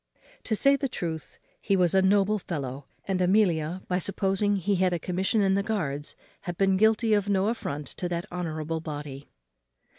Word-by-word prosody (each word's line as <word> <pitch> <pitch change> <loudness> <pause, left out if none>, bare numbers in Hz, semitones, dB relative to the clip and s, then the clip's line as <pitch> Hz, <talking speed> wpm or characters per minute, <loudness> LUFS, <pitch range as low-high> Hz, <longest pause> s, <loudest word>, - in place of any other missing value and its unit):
To 220 - 0
say 275 +6 +5
the 275 -1 -2
truth, 160 -7 -5 0.2
he 200 - +1
was 180 -2 +2
a 190 - +5
noble 200 +2 +3
fellow; 140 -6 -5 0.2
and 190 -1 0
Amelia, 180 -3 +2
by 180 0 0
supposing 195 +2 0
he 195 +1 0
had 185 0 +2
a - - +1
commission 190 +6 0
in 190 -1 +3
the 200 - +2
guards, 155 -9 -3 0.3
had 175 -1 -3
been 195 -1 +3
guilty 220 +2 +3
of 205 -1 +1
no 195 +1 +2
affront 150 -10 -4
to 180 - -3
that 170 0 -2
honourable 165 -2 -3
body. 145 -3 -7
185 Hz, 180 wpm, -27 LUFS, 160-200 Hz, 0.3 s, say